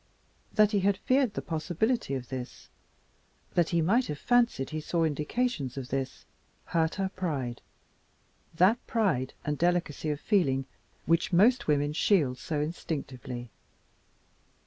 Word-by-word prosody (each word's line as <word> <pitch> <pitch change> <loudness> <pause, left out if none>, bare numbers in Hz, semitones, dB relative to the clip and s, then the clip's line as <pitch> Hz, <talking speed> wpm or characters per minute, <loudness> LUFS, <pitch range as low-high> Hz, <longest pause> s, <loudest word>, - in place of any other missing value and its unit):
That 215 -1 +4
he 205 - +2
had 195 0 +2
feared 255 -1 +1
the - - -3
possibility 170 - -1
of 125 -2 -6
this, 130 -2 -7 0.8
that 170 -2 +2
he 170 -2 +2
might 230 +9 +3
have 150 - -4
fancied 235 - +2
he 155 0 -3
saw 165 +2 0
indications 150 - -1
of 130 -2 -5
this, 135 0 -3 0.4
hurt 160 -1 0
her 195 -1 -1
pride 145 -11 -3 0.9
that 190 +8 +4
pride 175 - 0
and 150 -1 -2
delicacy 175 -3 0
of 145 -1 -2
feeling 135 -11 +1 0.4
which 165 +1 +2
most 225 +8 +4
women 145 0 +2
shield 150 -7 +2
so 150 -2 -2
instinctively. 130 -6 -5
160 Hz, 135 wpm, -29 LUFS, 140-200 Hz, 0.9 s, That